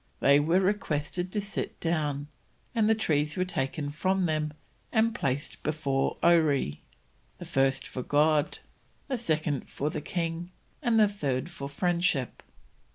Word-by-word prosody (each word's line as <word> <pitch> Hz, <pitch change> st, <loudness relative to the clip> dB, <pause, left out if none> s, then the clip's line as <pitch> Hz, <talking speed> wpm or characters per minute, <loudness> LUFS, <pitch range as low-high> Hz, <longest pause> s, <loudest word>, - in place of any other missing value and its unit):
They 140 Hz, +1 st, +6 dB
were 165 Hz, +5 st, +3 dB
requested 180 Hz, -3 st, -1 dB
to 210 Hz, -, -1 dB
sit 200 Hz, 0 st, -4 dB
down, 150 Hz, -4 st, -1 dB, 0.5 s
and 220 Hz, -3 st, +3 dB
the 220 Hz, -, +5 dB
trees 150 Hz, -7 st, 0 dB
were 185 Hz, -, +1 dB
taken 145 Hz, -3 st, -2 dB
from 185 Hz, +5 st, +1 dB
them 155 Hz, -2 st, 0 dB, 0.4 s
and 225 Hz, 0 st, +3 dB
placed 140 Hz, -, -2 dB
before 145 Hz, -3 st, 0 dB
Oree, 145 Hz, -, +3 dB, 0.6 s
the -, -, -8 dB
first 135 Hz, 0 st, +1 dB
for 130 Hz, -, -5 dB
God, 150 Hz, +2 st, +2 dB, 0.5 s
the 260 Hz, -3 st, -1 dB
second 155 Hz, -, -1 dB
for 150 Hz, +2 st, -2 dB
the -, -, -3 dB
king, 170 Hz, +1 st, -3 dB, 0.3 s
and 235 Hz, -5 st, +3 dB
the 215 Hz, -, +7 dB
third 150 Hz, -6 st, -2 dB
for 140 Hz, -4 st, -6 dB
Friendship. 170 Hz, -4 st, 0 dB
155 Hz, 145 wpm, -28 LUFS, 145-185 Hz, 0.6 s, the